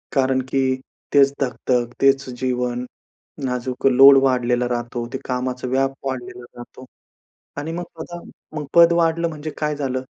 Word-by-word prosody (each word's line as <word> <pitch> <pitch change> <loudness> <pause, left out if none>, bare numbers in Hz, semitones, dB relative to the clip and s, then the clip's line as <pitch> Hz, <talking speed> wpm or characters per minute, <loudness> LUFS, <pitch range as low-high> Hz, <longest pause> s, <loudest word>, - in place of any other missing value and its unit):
कारण 130 -1 +2
की 135 - +1 0.5
तेच 140 -1 +5
धकधक, 125 -2 -1
तेच 135 0 +3
जीवन, 125 -1 -1 0.6
नाजूक 125 +1 -3
लोड 135 +1 +8
वाढलेला 125 -2 +1
राहतो. 120 0 -3
ते - - -1
कामाचा 125 0 -3
व्याप 135 +1 0
वाढलेला 125 -1 -6
राहतो. 120 +1 -12 0.7
आणि 150 +3 -4
मग 175 +1 -4 0.2
पद, 175 - -8 0.6
पद 170 0 +7
वाढलं 170 0 +1
म्हणजे 155 0 -6
काय 150 -1 -1
झालं? 130 -3 -2
130 Hz, 135 wpm, -21 LUFS, 125-140 Hz, 0.7 s, लोड